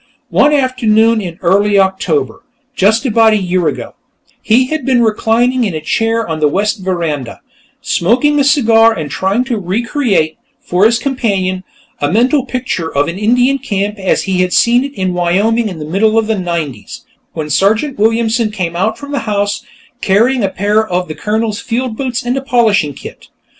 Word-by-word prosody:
One 290 - +4
afternoon 230 -5 +2
in 175 -4 -7
early 200 +3 +2
October 190 - 0 0.3
just 220 +4 +2
about 225 -2 +4
a - - +3
year 185 -3 0
ago - - -4 0.5
he 240 +4 +3
had 310 +4 -3
been 255 -3 +2
reclining 230 +3 +1
in 200 -7 -2
a - - -2
chair 225 +8 -1
on 160 -1 -3
the 150 - +3
west 205 +7 -1
veranda, 165 -9 -3 0.4
smoking 255 - +1
a - - +3
cigar 230 -5 +4
and 155 -7 -5
trying 195 +9 0
to 245 -4 -3
re 195 +5 -2
create, 230 - 0 0.2
for 180 +3 +1
his 230 +1 +1
companion, 200 -8 -2 0.4
a 145 - -1
mental 255 - +2
picture 245 -11 -3
of 145 +1 0
an 170 +3 -5
Indian 245 +5 +2
camp 205 -5 -3
as 190 - 0
he 185 -2 0
had 180 0 0
seen 240 +2 +3
it 280 0 -6
in 185 -3 -2
Wyoming 205 +6 +1
in 180 - -7
the 150 - -6
middle 195 +8 +1
'90's, 170 - -4 0.3
when 150 -2 -5
Sergeant 220 - +1
Williamson 225 +1 +1
came 180 -5 -4
out 220 +5 -1
from 285 0 -9
the 285 - -1
house, 205 0 -1 0.4
carrying 230 +5 +2
a 195 - +1
pair 205 +3 +1
of 180 -4 -3
the - - -4
Colonel's 215 +3 -2
field 240 0 -3
boots 255 -1 -3
and 245 +1 0
a 270 - -2
polishing 220 - +1
kit. - - -11
215 Hz, 180 wpm, -14 LUFS, 185-240 Hz, 0.5 s, One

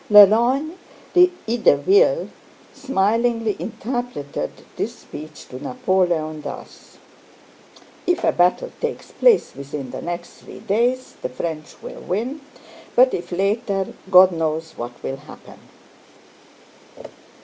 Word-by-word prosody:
Lelorgne 235 - +6 0.4
d'Ideville 365 - +3 0.4
smilingly 230 -3 +1
interpreted 230 - -4 0.3
this - - -3
speech 155 0 -11
to 130 +1 -9
Napoleon 180 -10 0
thus: - - -10 1.1
"If 355 -1 +1
a - - +4
battle 180 - +2
takes 475 -1 -4
place 485 -4 +3
within 140 -1 -6
the - - -6
next 175 0 -6
three - - -12
days 235 +5 0
the - - -3
French 155 +4 -5
will - - -8
win, 255 - -3 0.5
but 255 +1 +6
if 175 0 -4
later, 195 +1 -1 0.2
God 185 0 +8
knows 160 -1 -2
what 120 -4 -8
will 135 - -3
happen." 145 +2 -14
205 Hz, 105 wpm, -21 LUFS, 160-255 Hz, 1.1 s, God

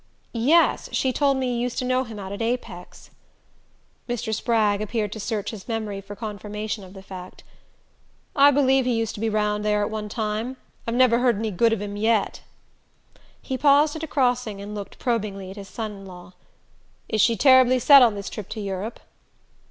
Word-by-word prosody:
"Yes: 280 +9 +3
she 260 -1 0
told 275 -1 +2
me 255 -2 -1
you 235 - -2
used 245 0 -2
to 255 - -1
know 255 +1 +1
him 225 -2 -9
out 195 -1 -7
at 200 - -5
Apex." 225 -7 -5 1.0
Mr. 240 -2 -2
Spragg 215 -2 +1
appeared 215 -1 -2
to 220 - -6
search 210 -1 -3
his 205 -4 -10
memory 215 -3 -3
for 200 +1 -10
confirmation 210 -1 -5
of 185 +1 -13
the 190 - -11
fact. 185 -1 -10 0.9
"I 280 0 +7
believe 270 -2 +3
he 250 -2 +1
used 225 -1 -1
to - - -8
be 225 - +1
round 210 -1 0
there 210 0 +1
at 205 - -3
one 215 -1 -4
time. 220 +4 -3 0.3
I've 230 - -1
never 245 -2 +4
heard 245 -4 +2
any 220 0 -2
good 225 +5 +2
of 215 -2 -1
him 205 0 -5
yet." 220 0 0 1.0
He 260 -1 -4
paused 295 +1 +4
at 315 - -5
a 320 - -4
crossing 250 -7 0
and 205 +1 -7
looked 205 -2 -7
probingly 205 -6 -2
at - - -10
his 200 -1 -8
son 220 -2 -5
in 195 -1 -11
law. 180 -1 -12 0.7
"Is 220 -2 +1
she 230 -1 +3
terribly 260 -2 +6
set 275 +3 +8
on 230 -4 +5
this 200 -1 -6
trip 205 -3 -7
to 220 - -6
Europe?" 200 +2 -5
220 Hz, 200 wpm, -24 LUFS, 205-250 Hz, 1.0 s, set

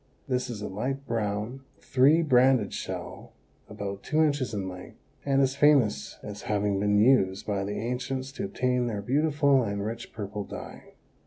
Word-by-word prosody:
This 125 -1 -1
is 105 -3 -5
a - - -3
light 135 +7 -3
brown, 110 +2 -2 0.2
three 140 +6 +4
banded 130 -6 +4
shell - - -6 0.4
about 100 -2 -5
two 155 +1 +2
inches 145 -5 0
in 100 -3 -3
length 90 -1 -9 0.3
and 135 0 +4
is 135 0 0
famous 135 - +3
as 105 0 -7
having 100 -1 +1
been 105 0 +2
used 105 -4 +3
by 100 -2 -1
the 100 +1 -4
ancients 125 +3 -3
to 195 +9 -4
obtain 125 -10 0
their 105 -3 -3
beautiful 140 +2 +3
and 100 -3 -2
rich 115 +2 -5
purple 105 -1 -5
dye. - - -10
120 Hz, 165 wpm, -27 LUFS, 105-135 Hz, 0.4 s, three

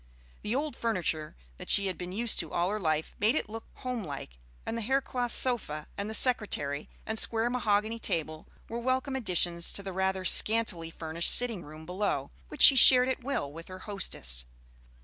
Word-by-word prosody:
The 215 +3 -3
old 290 -1 -3
furniture 170 -9 -3 0.2
that - - -11
she 200 - +5
had 190 -2 -3
been 180 0 -8
used 225 +4 +1
to 165 -4 -4
all 175 +2 -1
her 215 - -3
life 155 -4 -2
made 220 +7 +2
it - - -2
look 225 +1 -9
homelike, 170 - -7 0.3
and - - -4
the 230 - -4
hair 265 +5 +1
cloth 245 -3 -4
sofa 210 - -1
and 200 +1 -5
the 220 - -1
secretary 175 - +1 0.2
and 220 0 -3
square 230 +1 -1
mahogany 220 -2 -1
table 155 -5 -4 0.2
were 235 - -5
welcome 260 +2 -2
additions 175 -7 +2
to 200 - -3
the 195 -1 -7
rather 190 0 -2
scantily 210 -6 +3
furnished 165 +1 -1
sitting 235 -6 +5
room 155 +1 -12
below, 180 -5 -3 0.2
which - - 0
she 275 - +10
shared 255 0 +7
at 260 - -4
will 235 - -3
with 165 +1 -11
her 185 - -9
hostess. 60 - -2
205 Hz, 190 wpm, -28 LUFS, 165-235 Hz, 0.3 s, she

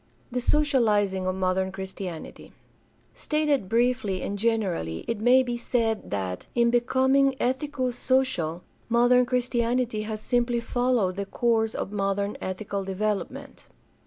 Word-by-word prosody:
The 250 +1 -1
socializing 215 -10 +2
of 185 - 0
modem 190 0 0
Christianity. 190 -3 -7 0.3
— - - -37
Stated 300 -9 +1
briefly 230 -5 +1
and 200 - -3
generally, 195 - -1
it 230 -2 -2
may 250 +4 +5
be 240 -1 -3
said 230 -2 -1
that, 95 -3 -4
in 235 -1 +3
becoming 265 +3 +3
ethico 260 0 -1
social, 245 -11 0 0.3
modern 245 +1 +4
Christianity 245 -2 0
has 215 0 -4
simply 240 +1 0
followed 235 -5 0
the 200 -1 -3
course 225 0 +1
of - - -4
modern 200 0 -1
ethical 195 +1 -4
development. 210 +7 -3
230 Hz, 130 wpm, -26 LUFS, 195-250 Hz, 0.3 s, may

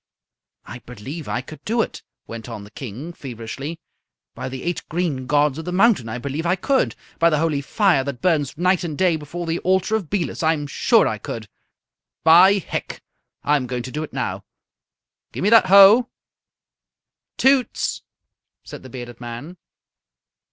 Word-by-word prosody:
"I 120 - -9
believe 130 +7 -8
I 120 - -2
could 155 +4 -12
do 230 +1 +1
it," - - -8 0.2
went 115 +1 -8
on 110 -3 -7
the 105 - -14
King, 130 +8 -7
feverishly. 135 +4 -7 0.5
"By 130 +1 -6
the 130 0 -7
eight 175 0 -2
green 155 -7 -2
gods 145 0 +2
of 160 - -7
the 180 - -3
mountain, 190 - +3
I 110 - -4
believe 140 +5 -4
I 175 +2 +2
could! 265 +8 0 0.2
By 170 - +5
the 155 - +1
holy 150 -2 0
fire 180 -1 +2
that 140 -3 -5
burns 150 -3 0
night 180 +2 +2
and 155 -4 -4
day 180 -3 +3
before 160 +3 -6
the 165 +1 -1
altar 190 +4 +1
of 195 -8 -3
Belus, 195 -5 -2
I'm 160 -2 +1
sure 220 - +3
I 110 - -3
could! 110 0 -6 0.8
By 175 +5 +7
Hec, 200 -3 -4 0.4
I'm 145 -3 +1
going 125 -1 -3
to 130 - -7
do 150 - -3
it 155 - -6
now! - - -3 0.9
Gimme 205 +4 0
that 230 - +7
hoe!" 200 +6 +8 1.3
"Toots!" 265 -2 +2 0.6
said - - -10
the 130 - -12
bearded 120 -1 -9
man. 120 +9 -7
155 Hz, 165 wpm, -21 LUFS, 130-180 Hz, 1.3 s, hoe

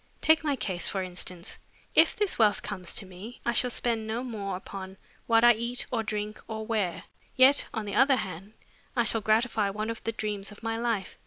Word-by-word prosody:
Take 315 0 +4
my 290 -2 +1
case, 190 -7 -2
for 190 -1 -2
instance. 180 -1 -5 0.3
If - - +5
this 415 -9 -1
wealth 210 -2 +3
comes 185 -4 -5
to 200 - -2
me, 190 +6 -10
I 235 - +1
shall 250 - +2
spend 230 -2 0
no 225 +3 -2
more 200 -6 -4
upon 190 0 -8 0.3
what 230 0 +4
I 240 0 +8
eat 235 +2 +2
or 235 -3 +1
drink 210 -1 -4
or 220 -1 -5
wear, 210 -6 -1 0.3
yet, 265 +2 +6
on 220 -2 -4
the 200 - -5
other 270 0 +5
hand, 195 -2 -6 0.4
I 240 - +3
shall 225 -1 +3
gratify 220 -1 +2
one 215 +3 -3
of 230 - -7
the 225 - -1
dreams 210 -2 -4
of 205 - -14
my 225 0 -1
life. 225 -5 -2
220 Hz, 210 wpm, -28 LUFS, 200-235 Hz, 0.4 s, I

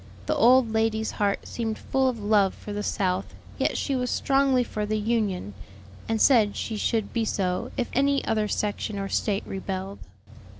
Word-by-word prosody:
The - - 0
old 245 -1 +5
lady's 220 0 +1
heart 200 -1 -1
seemed 225 -2 -3
full 265 0 0
of 250 - -3
love 205 -2 +3
for 210 - -8
the 205 - -3
South, 185 -2 -1 0.2
yet - - +1
she 275 - -1
was 250 -1 -1
strongly 270 -1 +2
for 215 -3 -4
the 215 +1 -1
Union, 210 - -1 0.6
and 225 -1 +1
said 220 -6 +4
she 225 - -3
should 220 0 -1
be 230 - +1
so 185 -4 -1
if 245 - 0
any 275 +1 +2
other 215 -1 +1
section 210 0 -2
or 195 0 -3
State 205 -2 0
rebelled. 190 0 -5
215 Hz, 175 wpm, -26 LUFS, 200-235 Hz, 0.6 s, old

